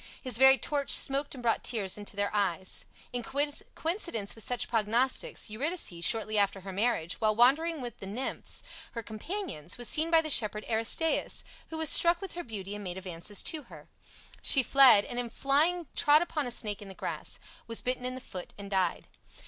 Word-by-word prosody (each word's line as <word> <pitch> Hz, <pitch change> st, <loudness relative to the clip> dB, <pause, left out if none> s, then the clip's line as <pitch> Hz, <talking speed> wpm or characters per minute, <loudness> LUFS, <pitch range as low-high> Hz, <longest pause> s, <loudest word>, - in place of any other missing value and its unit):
His 250 Hz, -3 st, +3 dB
very 265 Hz, 0 st, +8 dB
torch 285 Hz, 0 st, -3 dB
smoked 280 Hz, +1 st, +3 dB
and 250 Hz, -, -10 dB
brought 230 Hz, -1 st, 0 dB
tears 205 Hz, -6 st, 0 dB
into 205 Hz, -1 st, -6 dB
their 205 Hz, 0 st, -1 dB
eyes. 190 Hz, -3 st, -1 dB, 0.3 s
In 245 Hz, -, -2 dB
coincidence 290 Hz, -, -2 dB
with 225 Hz, -, -3 dB
such 245 Hz, -1 st, -1 dB
prognostics, 240 Hz, -, 0 dB
Eurydice, 225 Hz, -, -1 dB
shortly 215 Hz, 0 st, +2 dB
after 200 Hz, -1 st, +1 dB
her 190 Hz, 0 st, -8 dB
marriage, 200 Hz, -4 st, 0 dB
while 215 Hz, -1 st, +2 dB
wandering 290 Hz, +7 st, +3 dB
with 240 Hz, -3 st, -8 dB
the 195 Hz, -, -8 dB
nymphs, 240 Hz, +7 st, -4 dB, 0.3 s
her 230 Hz, -, -5 dB
companions, 220 Hz, -, -6 dB
was 240 Hz, -1 st, -2 dB
seen 315 Hz, +8 st, +2 dB
by 330 Hz, -1 st, +5 dB
the 310 Hz, -, -3 dB
shepherd 215 Hz, -3 st, +1 dB
Aristaeus, 230 Hz, +8 st, +1 dB, 0.3 s
who 320 Hz, -, -6 dB
was 320 Hz, -2 st, +2 dB
struck 340 Hz, 0 st, +5 dB
with 390 Hz, -2 st, -8 dB
her 350 Hz, -, -6 dB
beauty 205 Hz, -4 st, -7 dB
and 205 Hz, 0 st, -7 dB
made 180 Hz, -1 st, -5 dB
advances 185 Hz, +2 st, -5 dB
to 315 Hz, -, -1 dB
her. -, -, -14 dB, 0.5 s
She 270 Hz, -, +7 dB
fled, 255 Hz, -6 st, +7 dB
and 245 Hz, -, -4 dB
in 240 Hz, -1 st, -3 dB
flying 305 Hz, +7 st, +1 dB
trod 300 Hz, +3 st, +5 dB
upon 300 Hz, -5 st, -3 dB
a -, -, -3 dB
snake 210 Hz, -4 st, -1 dB
in 205 Hz, -, -10 dB
the 190 Hz, -, -11 dB
grass, -, -, -4 dB, 0.3 s
was 230 Hz, -1 st, -1 dB
bitten 250 Hz, 0 st, -3 dB
in 255 Hz, 0 st, -4 dB
the 260 Hz, -, -7 dB
foot, 180 Hz, -7 st, -9 dB
and 200 Hz, 0 st, -9 dB
died. 185 Hz, -3 st, -1 dB
240 Hz, 195 wpm, -29 LUFS, 205-290 Hz, 0.5 s, very